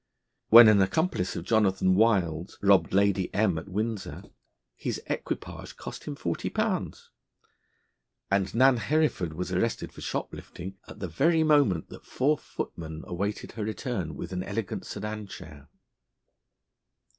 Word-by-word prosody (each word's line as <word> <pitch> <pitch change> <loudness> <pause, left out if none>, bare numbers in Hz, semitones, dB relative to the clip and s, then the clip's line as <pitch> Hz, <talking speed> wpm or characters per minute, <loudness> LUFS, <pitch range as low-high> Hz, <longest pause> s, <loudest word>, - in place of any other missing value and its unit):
When 115 0 +11
an 105 -2 +6
accomplice 95 - 0
of 85 - -5
Jonathan 95 -4 +3
Wild's 95 -5 +1
robbed 100 -4 +4
Lady 100 -1 +2
M 105 -1 +3
n 80 - -4
at 85 - -11
Windsor, 105 +2 -3 0.5
his - - -3
equipage - - -5
cost - - -8
him - - -5
forty - - -3
pounds; - - -2 1.2
and 95 -1 +1
Nan 130 +1 +5
Hereford 145 - 0
was 90 +3 -4
arrested 105 +5 -1
for - - -11
shoplifting 95 +3 -5
at - - -11
the 95 - -2
very 160 - +2
moment 145 - +3
that - - -12
four 145 +4 +2
footmen 80 - -7
awaited 100 +4 -3
her 110 - -5
return 105 - -3
with 90 - -6
an 90 - -2
elegant 100 +2 -4
sedan 105 0 -5
chair. 75 -6 -11
100 Hz, 140 wpm, -27 LUFS, 90-115 Hz, 1.2 s, When